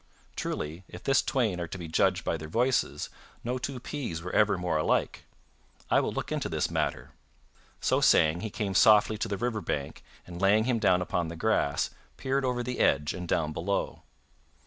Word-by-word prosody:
Truly, 80 +5 -4
if 90 - -11
this 135 - +3
twain 115 -10 0
are 85 - -3
to 85 - -7
be 85 -2 -7
judged 90 +2 +1
by - - 0
their 80 -1 -6
voices, 125 +10 0 0.3
no 125 +2 -2
two 130 0 -4
peas 125 - -5
were 90 - -6
ever 105 -2 +3
more 90 -2 -1
alike. 75 - 0 0.7
I - - +5
will - - -1
look - - -4
into - - -2
this - - -1
matter." - - -2 0.7
So - - +2
saying, 80 +3 +4
he 110 - -3
came 100 -1 -3
softly 105 +1 +5
to 115 - -1
the 100 -2 -3
river 115 0 -2
bank 70 -5 -4 0.2
and 90 0 -9
laying 105 +3 +4
him 120 -1 +1
down 90 -4 +3
upon 90 -1 -1
the 85 - -6
grass, 85 -6 +1 0.3
peered 135 +1 -1
over 125 -1 -1
the 125 +1 -4
edge 75 +2 +2
and 90 -1 -6
down 75 -2 0
below. 100 +5 -2
95 Hz, 190 wpm, -28 LUFS, 85-120 Hz, 0.7 s, I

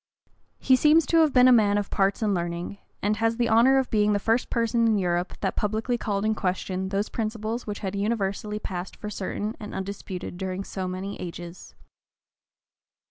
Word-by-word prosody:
He 260 - +4
seems 305 +4 +5
to 330 - +2
have 315 -2 +5
been 250 -1 +6
a - - +7
man 210 -4 +4
of 205 -1 -2
parts 195 +3 +1
and 210 -2 +2
learning; 175 +2 -3 0.2
and 210 +1 +1
has 225 +1 +1
the 240 -1 +2
honor 235 +4 +5
of 265 -1 0
being 210 -1 +3
the - - +2
first 225 +4 +1
person 230 0 +1
in 220 -2 +3
Europe 175 -1 -1
that - - -1
publicly 220 +4 -1
called 205 -3 -2
in 220 - +2
question 190 -1 -2
those 200 +2 -1
principles 225 +1 -3
which 205 -1 -5
had 195 -1 -3
universally 210 0 -1
passed 185 -3 -5
for 210 - -6
certain 205 +2 -3
and 210 - -7
undisputed 190 -2 -6
during 190 0 -3
so 190 -1 -4
many 185 +2 -5
ages. 175 0 -8
210 Hz, 190 wpm, -26 LUFS, 190-230 Hz, 0.2 s, a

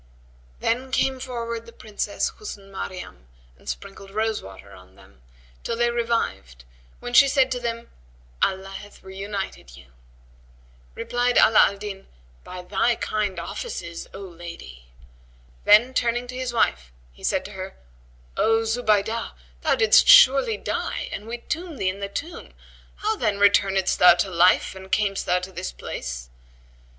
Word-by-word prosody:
Then 255 +3 0
came 265 0 +1
forward 235 -3 -5
the - - -11
Princess 215 -2 -3
Husn 200 - -10
Maryam 180 - -7 0.3
and - - -10
sprinkled 195 0 -7
rose 220 +2 -1
water 95 +1 -12
on 95 -1 -16
them, 65 - -20 0.4
till 230 - -3
they 240 0 +2
revived 230 - -2 0.3
when 245 - -7
she 275 +3 +8
said 265 -1 +2
to 250 - -1
them, 235 -1 -5 0.5
"Allah 190 0 0
hath 205 +1 -11
reunited 190 - -6
you." 65 -3 -17 1.0
Replied 245 0 0
Ala 220 - +7
al 200 - -5
Din, 195 -1 -7 0.4
"By 180 0 -8
thy 205 +6 +1
kind 210 -4 -2
of - - -6
offices, 170 - -6
O 195 - -9
lady." 170 - -10 0.8
Then, 220 +5 +6
turning 240 0 0
to 250 - -6
his 255 -1 -3
wife, 65 - 0 0.2
he - - -19
said - - 0
to - - -8
her, - - -7 0.6
"O 225 +1 +3
Zubaydah, 225 -1 0 0.3
thou - - +2
didst 440 -3 +5
surely - - +7
die - - -3
and 210 - -6
we 235 +1 -4
tombed 320 +5 -5
thee 185 - 0
in 190 +2 -5
the 200 0 -4
tomb: 325 - -7 0.4
how 435 +1 -1
then 215 - 0
returnedst 195 -1 +3
thou 180 -1 +8
to 180 +2 -1
life 180 +1 +4
and 190 0 -12
camest 200 -2 0
thou 180 - +3
to 180 +1 -5
this 185 +1 -5
place?" - - -7
205 Hz, 155 wpm, -24 LUFS, 185-240 Hz, 1.0 s, she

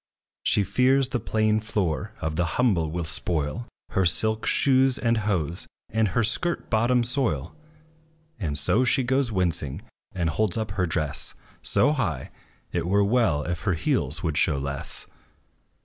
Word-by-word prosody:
She 105 - +2
fears 130 +5 +2
the 125 - -1
plain 110 -1 +1
floor 105 -2 -2
of 80 -1 -2
the 85 +2 +1
humble 95 -11 +2
will 85 +2 -3
spoil 80 +7 -2 0.2
Her 95 - +1
silk 110 +6 +2
shoes 130 -1 +3
and 115 -1 +1
hose, 90 -6 -2 0.2
and 110 0 +2
her 115 +5 +1
skirt 170 +10 0
bottom 120 +2 +3
soil; 125 +1 -1 0.8
And 75 -8 -2
so 105 - +3
she 130 +1 +3
goes 130 +1 +1
winching; 85 -6 -1 0.3
and 85 -4 -1
holds 105 +1 0
up 110 -2 -2
her 95 -2 0
dress 75 -4 -3 0.3
So 145 - +2
high, 150 -4 -2 0.4
it - - -2
were 100 +2 +3
well 105 -9 +2
if 85 +2 -3
her 95 -5 0
heels 80 +1 -1
would 80 -3 -1
show 75 - +2
less. 70 0 -4
105 Hz, 155 wpm, -25 LUFS, 85-120 Hz, 0.8 s, shoes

